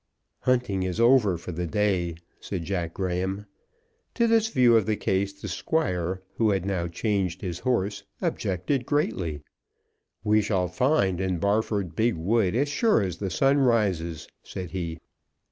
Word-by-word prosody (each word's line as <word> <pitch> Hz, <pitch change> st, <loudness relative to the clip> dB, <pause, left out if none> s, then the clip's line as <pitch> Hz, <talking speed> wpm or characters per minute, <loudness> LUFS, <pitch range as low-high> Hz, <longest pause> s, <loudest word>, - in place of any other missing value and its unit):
"Hunting 125 Hz, -7 st, +1 dB
is 95 Hz, +2 st, -2 dB
over 115 Hz, -6 st, +5 dB
for 85 Hz, -, -7 dB
the 85 Hz, +1 st, -3 dB
day," 95 Hz, -4 st, 0 dB, 0.2 s
said 90 Hz, -4 st, -4 dB
Jack 85 Hz, -2 st, -3 dB
Graham. 95 Hz, +2 st, -2 dB, 0.7 s
To 235 Hz, -, +3 dB
this 225 Hz, -1 st, +3 dB
view 125 Hz, -, +4 dB
of 110 Hz, -3 st, +3 dB
the 110 Hz, -, +2 dB
case 100 Hz, 0 st, 0 dB
the 100 Hz, 0 st, -9 dB
Squire, 95 Hz, -, -1 dB
who 110 Hz, -2 st, +3 dB
had 95 Hz, -3 st, 0 dB
now 90 Hz, -3 st, -1 dB
changed 95 Hz, 0 st, -1 dB
his 90 Hz, -4 st, -4 dB
horse, 105 Hz, -5 st, 0 dB, 0.2 s
objected 100 Hz, -, -1 dB
greatly. 90 Hz, -, -1 dB, 0.8 s
"We 105 Hz, 0 st, +4 dB
shall 95 Hz, -4 st, 0 dB
find 95 Hz, -, +1 dB
in 95 Hz, -2 st, 0 dB
Barford 100 Hz, -2 st, 0 dB
big 115 Hz, +4 st, +2 dB
wood 95 Hz, +3 st, +1 dB
as 140 Hz, +4 st, +2 dB
sure 175 Hz, -, +2 dB
as 90 Hz, -3 st, -3 dB
the 100 Hz, -, -3 dB
sun 135 Hz, +8 st, +3 dB
rises," 100 Hz, -, +1 dB
said 90 Hz, -3 st, -7 dB
he. 85 Hz, -3 st, -4 dB
100 Hz, 155 wpm, -26 LUFS, 90-115 Hz, 0.8 s, over